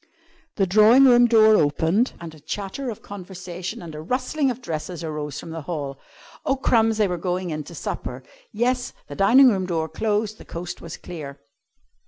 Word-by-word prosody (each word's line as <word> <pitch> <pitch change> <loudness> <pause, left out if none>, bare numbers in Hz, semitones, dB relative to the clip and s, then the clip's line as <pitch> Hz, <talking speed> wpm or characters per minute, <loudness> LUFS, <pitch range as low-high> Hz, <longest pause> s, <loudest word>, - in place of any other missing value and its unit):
The 195 - +2
drawing 215 +8 +6
room 245 -2 +7
door 220 -2 +6
opened 160 - +2
and 170 -2 -8
a 155 - -14
chatter 205 - -5
of 220 - -7
conversation 185 -2 -7
and 165 -2 -8
a 150 - -7
rustling 255 - 0
of 245 -1 -3
dresses 170 -4 -5
arose 150 -2 -4
from 165 - -8
the 165 0 -5
hall. 145 -4 -5 0.4
Oh, 270 - +1
crumbs! 225 -4 +2
They 210 -2 +3
were 180 -2 -3
going 180 0 -2
in 155 -1 -3
to 170 - -10
supper. 130 -3 -5 0.3
Yes, 245 +3 0
the 145 - -9
dining 250 - +6
room 190 -3 -1
door 165 -3 -1
closed; 210 +5 -1
the - - -11
coast 175 +1 -7
was 165 - -8
clear. 145 -5 -8
185 Hz, 185 wpm, -23 LUFS, 160-225 Hz, 0.4 s, room